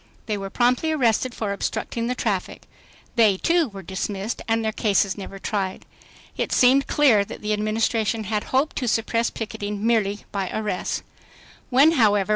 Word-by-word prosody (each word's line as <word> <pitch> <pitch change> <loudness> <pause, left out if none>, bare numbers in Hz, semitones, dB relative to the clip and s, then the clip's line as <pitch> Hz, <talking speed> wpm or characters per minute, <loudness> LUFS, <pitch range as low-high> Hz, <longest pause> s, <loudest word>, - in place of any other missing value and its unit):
They 215 - -1
were 195 -1 -5
promptly 250 +8 +2
arrested 250 -4 +1
for 205 -3 -2
"obstructing 230 +3 -3
the 250 - -1
traffic." 200 -7 -2 0.5
They, 215 -4 +5
too, 335 - +2
were 195 -2 -9
dismissed 195 +4 -4
and 225 0 +1
their 220 - +1
cases 200 -2 +1
never 195 -1 -8
tried. 195 -1 -3 0.5
It - - -2
seemed 265 +2 +4
clear 250 -9 +4
that - - -9
the 210 0 0
Administration 220 +1 0
hoped 225 +8 0
to 250 - -1
suppress 230 0 +1
picketing 210 -1 -5
merely 210 -3 +1
by 195 -2 -2
arrests. 210 -4 -2 0.7
When. 275 +5 +6
however. 210 - +3
220 Hz, 155 wpm, -23 LUFS, 200-240 Hz, 0.7 s, When